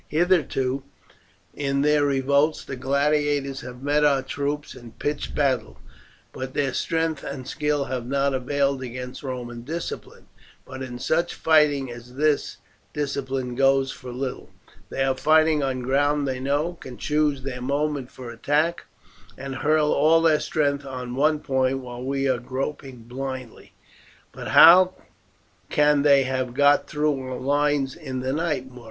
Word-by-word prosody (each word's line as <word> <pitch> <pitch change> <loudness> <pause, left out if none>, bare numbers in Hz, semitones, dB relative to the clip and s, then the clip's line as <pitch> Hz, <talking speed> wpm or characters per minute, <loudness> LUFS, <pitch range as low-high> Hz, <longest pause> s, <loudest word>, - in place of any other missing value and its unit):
Hitherto 150 -6 +1 0.7
in 140 -1 -1
their 150 0 +3
revolts 140 +2 +1
the 135 - -5
gladiators 140 +1 0
have 125 +1 -10
met 145 +1 +2
our 140 -2 +3
troops 145 +1 -3
in 120 -2 -12
pitched 145 +1 -3
battle, 130 -6 0 0.6
but 130 0 -6
their 135 -3 0
strength 160 -3 -1
and 130 -2 -6
skill 150 -1 -1
have 125 -2 -4
not 140 +1 +1
availed 140 +1 0
against 125 0 -7
Roman 125 -3 -6
discipline. 160 +7 -6 0.4
But 130 0 -9
in 125 -2 -6
such 160 +7 0
fighting 145 -5 +3
as 120 +1 -11
this 150 +1 +1 0.4
discipline 135 -3 -2
goes 135 +1 +3
for 125 -1 -9
little. 130 +1 -5 0.4
They 135 - -1
are 135 -1 +1
fighting 155 +2 +3
on 130 -2 -1
ground 145 +2 +1
they 130 -1 -2
know, 145 +6 0
can 125 -2 -9
choose 150 -3 0
their 125 -2 -5
moment 140 0 -1
for 125 -2 -9
attack, 150 +8 0 0.5
and 135 -1 -6
hurl 150 +1 +2
all 160 +3 +4
their 155 -2 +4
strength 140 -2 0
on 125 -2 -6
one 150 +3 +2
point 130 -1 +1
while 125 -1 -8
we 135 +1 -1
are 130 -2 +1
groping 130 0 -5
blindly." 130 0 -7 0.6
"But - - -8
how 185 +3 +8 0.7
can 150 -1 +3
they 140 -1 +5
have 130 -1 -2
got 145 +1 +4
through 150 -2 0
our 130 -1 -5
lines 145 0 +1
in 130 -1 -5
the 130 +1 -2
night, 150 -4 -1
Muro?" 125 -1 -13
140 Hz, 150 wpm, -24 LUFS, 130-150 Hz, 0.7 s, how